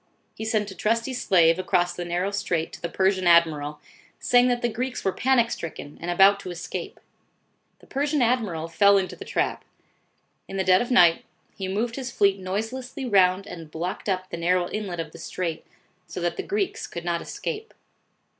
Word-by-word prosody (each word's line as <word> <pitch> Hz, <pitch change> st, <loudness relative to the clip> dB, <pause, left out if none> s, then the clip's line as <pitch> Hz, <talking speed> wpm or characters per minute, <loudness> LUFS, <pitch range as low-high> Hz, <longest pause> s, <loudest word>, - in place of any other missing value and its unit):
He 220 Hz, -, -6 dB
sent 215 Hz, -2 st, 0 dB
a -, -, -10 dB
trusty 230 Hz, +6 st, 0 dB
slave 175 Hz, -8 st, +3 dB
across 180 Hz, -1 st, +1 dB
the 175 Hz, -, -5 dB
narrow 175 Hz, +3 st, -1 dB
strait 175 Hz, -5 st, -2 dB
to -, -, -10 dB
the 170 Hz, -, -3 dB
Persian 190 Hz, 0 st, +1 dB
admiral, 155 Hz, -3 st, +3 dB, 0.4 s
saying 245 Hz, 0 st, +4 dB
that 245 Hz, -1 st, 0 dB
the -, -, +3 dB
Greeks 250 Hz, +2 st, -4 dB
were 190 Hz, -, +3 dB
panic 240 Hz, +1 st, +2 dB
stricken 155 Hz, -3 st, -7 dB
and 170 Hz, -, -4 dB
about 195 Hz, +3 st, +5 dB
to 185 Hz, -, -7 dB
escape. 175 Hz, -1 st, -6 dB, 0.8 s
The -, -, -17 dB
Persian 290 Hz, +2 st, -1 dB
admiral 215 Hz, -10 st, 0 dB
fell 200 Hz, +4 st, +5 dB
into 190 Hz, -1 st, -2 dB
the -, -, -9 dB
trap. -, -, -1 dB, 0.8 s
In 195 Hz, -, -6 dB
the 190 Hz, -, +1 dB
dead 185 Hz, 0 st, +5 dB
of 240 Hz, -, -3 dB
night, 175 Hz, -10 st, +5 dB, 0.3 s
he 190 Hz, -2 st, -4 dB
moved 230 Hz, +6 st, -2 dB
his 265 Hz, -2 st, -4 dB
fleet 200 Hz, -4 st, +2 dB
noiselessly 225 Hz, +8 st, -4 dB
round 190 Hz, -3 st, +3 dB
and 165 Hz, -5 st, -9 dB
blocked 175 Hz, +6 st, -4 dB
up 185 Hz, -1 st, -2 dB
the -, -, -4 dB
narrow 175 Hz, +1 st, +1 dB
inlet 195 Hz, -5 st, -4 dB
of 160 Hz, -1 st, -4 dB
the -, -, -12 dB
strait, 165 Hz, -3 st, -4 dB, 0.4 s
so -, -, -6 dB
that 175 Hz, -1 st, -1 dB
the -, -, -3 dB
Greeks 400 Hz, -1 st, -2 dB
could 170 Hz, 0 st, -7 dB
not 170 Hz, -1 st, -1 dB
escape. 445 Hz, -2 st, -5 dB
190 Hz, 190 wpm, -25 LUFS, 175-230 Hz, 0.8 s, about